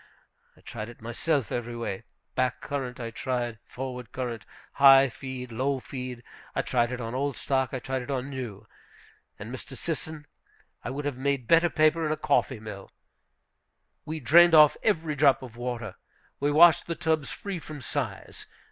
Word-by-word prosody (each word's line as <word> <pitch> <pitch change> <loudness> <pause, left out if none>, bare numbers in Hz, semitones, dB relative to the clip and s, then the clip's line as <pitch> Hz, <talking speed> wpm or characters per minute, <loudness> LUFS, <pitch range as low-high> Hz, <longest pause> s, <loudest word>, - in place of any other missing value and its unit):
I - - -20
tried 110 -1 -7
it 120 - -13
myself 120 +4 -1
every 120 0 -3
way; 115 -5 -4 0.3
back 130 -1 0
current, 130 -3 -4
I 115 -1 -5
tried; 120 -2 -3
forward 125 -2 -6
current; 120 -5 -5 0.3
high 135 -1 +8
feed; 125 0 -7
low 135 +4 0
feed; 125 -2 -7 0.3
I - - +1
tried 120 -1 +1
it 125 - -4
on 115 -1 -5
old 140 +1 -1
stock, 130 -2 0
I 130 - -2
tried 130 +1 -3
it 125 - -9
on 135 -1 -2
new; 115 -6 -6 0.7
and, 110 +5 -8
Mr. 130 0 -8
Sisson, 160 -2 -4 0.6
I - - -4
would 140 +3 -4
have 145 -3 -2
made 135 -2 -1
better 165 +1 +5
paper 155 +1 +3
in 155 - 0
a 155 - 0
coffee 140 -4 +1
mill! 105 -3 -9 1.1
We 160 +1 -5
drained 165 +6 +7
off 150 -1 +8
every 165 -7 +1
drop 140 -2 +4
of 120 -3 -10
water. 120 -4 -5 0.4
We 145 - +1
washed 165 +2 +6
the 170 - -2
tubs 160 -3 0
free 195 -3 -5
from 155 -2 -9
size. 130 -7 -5
130 Hz, 175 wpm, -27 LUFS, 120-145 Hz, 1.1 s, high